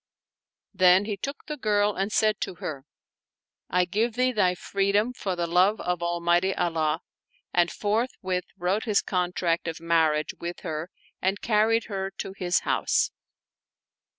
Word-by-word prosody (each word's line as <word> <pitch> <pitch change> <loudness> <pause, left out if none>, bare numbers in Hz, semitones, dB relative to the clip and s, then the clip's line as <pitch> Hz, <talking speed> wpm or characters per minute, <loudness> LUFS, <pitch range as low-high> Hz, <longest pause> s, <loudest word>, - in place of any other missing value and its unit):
Then 185 +2 +5
he 210 -1 -2
took 275 +8 -6
the 300 -1 -5
girl 210 -4 +2
and 195 +2 -2
said 215 0 +2
to - - -3
her, 145 -4 -6 0.4
" - - -67
I 180 0 +2
give 220 +5 0
thee 255 +1 +2
thy 190 -6 +2
freedom 200 +6 0
for 195 -6 -3
the 175 -1 -1
love 180 +5 +3
of 180 -1 -2
Almighty 175 +2 +1
Allah"; 160 -2 0 0.5
and 175 -1 +3
forth 220 +4 -1
with 185 -1 -2
wrote 185 +6 0
his 210 -3 +2
contract 175 -2 0
of 165 -1 -4
marriage 160 -2 +2
with 175 +1 -5
her 160 0 -4 0.3
and 190 +2 0
carried 225 +1 +2
her 195 -3 -3
to 190 - -5
his 180 -2 +1
house. - - +1
185 Hz, 155 wpm, -26 LUFS, 175-210 Hz, 0.5 s, Then